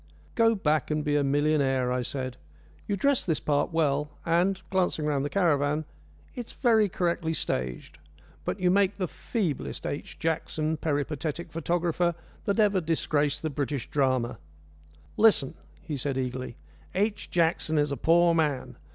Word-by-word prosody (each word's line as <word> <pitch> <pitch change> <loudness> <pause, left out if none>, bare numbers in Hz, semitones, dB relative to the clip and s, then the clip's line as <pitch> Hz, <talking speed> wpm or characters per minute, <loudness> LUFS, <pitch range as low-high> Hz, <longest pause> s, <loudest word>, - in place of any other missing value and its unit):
"Go 225 0 +4
back 155 -7 +1
and 150 0 0
be 145 0 +1
a 145 - +3
millionaire," 140 -3 +2
I 125 0 0
said. 130 0 -4 0.5
"You 205 - 0
dress 280 +5 +2
this 160 -4 0
part 145 +1 0
well, 150 -2 +1 0.2
and" 180 +3 +2
glancing 180 -5 +1
round 145 -2 +1
the 145 - -2
caravan 150 -3 +1 0.5
"it's 245 -3 -7
very 220 -5 +3
correctly 170 -2 -1
staged; 65 - -3 0.4
but - - -3
you 180 -1 +3
make 200 +1 +3
the 185 -3 -1
feeblest 175 - -3
H. 145 - -5
Jackson, 160 -1 -1
peripatetic 155 +2 -2
photographer, 170 +1 0 0.3
that 200 +2 0
ever 205 -3 +4
disgraced 150 -2 0
the 155 - -1
British 140 -2 -3
drama." 130 -5 +1 0.8
"Listen," 210 -12 +4 0.3
he 155 -5 -4
said 135 0 -1
eagerly. 125 -1 -3 0.4
"H. 210 +2 0
Jackson 165 -2 +1
is 145 -1 +2
a - - 0
poor 170 +1 +4
man. 135 -6 0
155 Hz, 150 wpm, -27 LUFS, 140-175 Hz, 0.8 s, Go